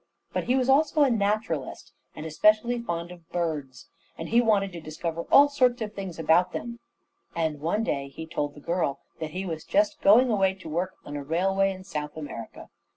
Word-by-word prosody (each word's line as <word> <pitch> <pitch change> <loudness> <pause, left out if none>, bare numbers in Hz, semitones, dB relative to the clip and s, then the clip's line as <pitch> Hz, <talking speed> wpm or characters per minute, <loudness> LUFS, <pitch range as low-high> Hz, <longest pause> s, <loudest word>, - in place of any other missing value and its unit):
But - - -1
he 250 - +2
was 260 -1 +1
also 295 +2 +4
a 275 - +3
naturalist, 200 - -2 0.2
and 155 - -7
especially 215 +9 +3
fond 170 -5 -4
of 170 -2 -14
birds, 150 -8 -3 0.3
and 165 - -6
he 235 +2 +5
wanted 205 -4 +2
to 170 -2 -8
discover 160 +2 -5
all 285 +1 +8
sorts 255 -4 +2
of 210 -1 -6
things 195 -4 -6
about 165 +3 +3
them; 235 0 -5 0.6
and 160 -3 -1
one 170 +9 0
day 140 -9 -2
he 150 +4 -8
told 145 -3 -3
the 145 - -12
girl 170 -4 -1 0.2
that 160 -1 -4
he 185 +4 -5
was 160 -3 -4
just 305 0 +1
going 240 +5 +6
away 195 -2 +2
to 185 -3 -12
work 175 +4 -2
on 145 - -7
a 145 - -4
railway 195 +6 +1
in 185 0 -8
South 150 -5 -5
America. 145 -7 -8
180 Hz, 200 wpm, -26 LUFS, 160-220 Hz, 0.6 s, all